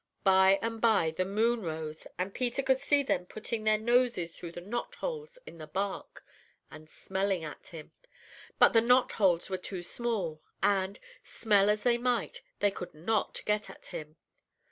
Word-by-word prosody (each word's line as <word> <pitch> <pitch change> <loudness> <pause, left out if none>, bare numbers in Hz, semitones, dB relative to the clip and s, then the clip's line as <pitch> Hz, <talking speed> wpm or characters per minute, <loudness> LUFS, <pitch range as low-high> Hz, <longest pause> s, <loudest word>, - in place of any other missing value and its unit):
"By 190 0 +6
and 225 -1 -3
by 215 -8 +3
the 185 +3 -1
moon 225 +4 +1
rose, 155 -3 -5
and 185 +2 -3
Peter 250 +2 0
could 265 0 +2
see 285 +1 +3
them 180 -9 -1
putting 215 +1 -5
their 215 0 +4
noses 235 -7 +1
through 170 -1 -8
the - - -6
knotholes 450 - -5
in 165 - -12
the 155 - -8
bark, 195 +4 -4 0.5
and 155 0 -12
smelling 190 -1 -2
at 150 -2 -8
him. 160 -3 -10 0.7
But - - +6
the 225 - +6
knotholes 215 -8 +3
were 185 - 0
too 185 -1 -6
small, 185 -7 -2 0.2
and, 195 0 +1 0.2
smell 205 -2 +2
as 210 0 +1
they 240 -1 +3
might, 245 -1 -1 0.2
they 205 0 +4
could 180 -4 -8
not 200 +7 -1
get 210 0 0
at - - -13
him. 155 0 -7
200 Hz, 165 wpm, -30 LUFS, 175-235 Hz, 0.7 s, By